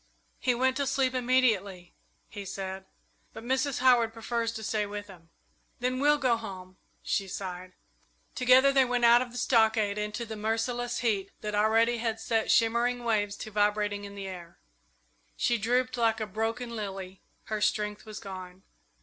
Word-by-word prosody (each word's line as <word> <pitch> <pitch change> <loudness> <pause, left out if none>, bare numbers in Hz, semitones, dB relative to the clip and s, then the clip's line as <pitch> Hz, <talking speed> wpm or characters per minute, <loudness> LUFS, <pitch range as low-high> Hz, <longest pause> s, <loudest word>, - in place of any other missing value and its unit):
"He 250 -1 +1
went 260 +2 +1
to 280 -1 0
sleep 265 -1 +1
immediately," 225 -8 +1 0.3
he 205 - -8
said; 190 0 -6 0.5
"but - - -9
Mrs. 265 +2 0
Howard 240 -3 +4
prefers 230 0 -2
to 220 - -6
stay 210 0 -1
with 205 0 -6
him." 175 -5 -15 0.5
"Then 250 +1 -1
we'll 295 +1 +4
go 255 -4 +2
home," 185 -4 -9 0.3
she 195 - -1
sighed. 185 -1 -6 0.6
Together 255 +2 +5
they 270 -1 +5
went 245 -1 +1
out 235 +1 +7
of 250 -1 -4
the 245 - -8
stockade 220 -4 +2
into 210 +3 -3
the 220 -1 -6
merciless 240 +3 -2
heat 205 -5 0
that 210 0 -4
already 225 +3 +3
had 225 -1 -2
set 225 -1 0
shimmering 235 +2 +2
waves 205 -3 0
to 215 - -8
vibrating 205 0 0
in 200 0 -9
the 200 -1 -6
air. 180 -3 -9 0.8
She 240 -1 +1
drooped 250 +4 +1
like 225 -1 +2
a 215 - -2
broken 225 +3 -3
lily 195 -3 -6 0.2
her 215 -1 -4
strength 210 0 0
was 215 0 -7
gone. 185 -2 -9
225 Hz, 165 wpm, -29 LUFS, 205-245 Hz, 0.8 s, out